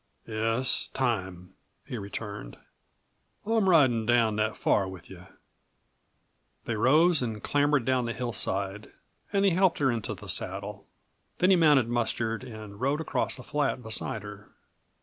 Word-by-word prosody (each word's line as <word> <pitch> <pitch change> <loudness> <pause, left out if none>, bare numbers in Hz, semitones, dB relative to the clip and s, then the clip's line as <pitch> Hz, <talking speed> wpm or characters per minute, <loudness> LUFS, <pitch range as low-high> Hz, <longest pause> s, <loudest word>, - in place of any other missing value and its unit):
"Yes, 115 +3 0
time," 95 -8 -2 0.3
he 135 - -6
returned. 100 - -7 0.9
"I'm 220 -3 +2
ridin' 125 -10 +4
down 115 -3 +3
that 110 0 0
far 100 - +2
with 95 0 -11
you." 90 0 -12 1.4
They 120 - -2
rose 155 +8 +4
and 110 -4 -4
clambered 145 -3 +2
down 130 -1 +1
the 115 - -2
hillside 100 -4 -3 0.4
and 200 -1 +2
he 195 - +5
helped 185 0 +3
her 135 -3 +2
into 115 -3 -3
the - - -12
saddle. - - -4 0.5
Then 180 +2 +4
he - - +7
mounted 150 -8 +5
Mustard 115 -1 -1
and 110 -4 -10
rode 140 +3 +1
across 160 - -1
the 130 - -10
flat 140 -3 -1
beside 110 -1 -3
her. 105 -1 -10
120 Hz, 145 wpm, -28 LUFS, 105-145 Hz, 1.4 s, he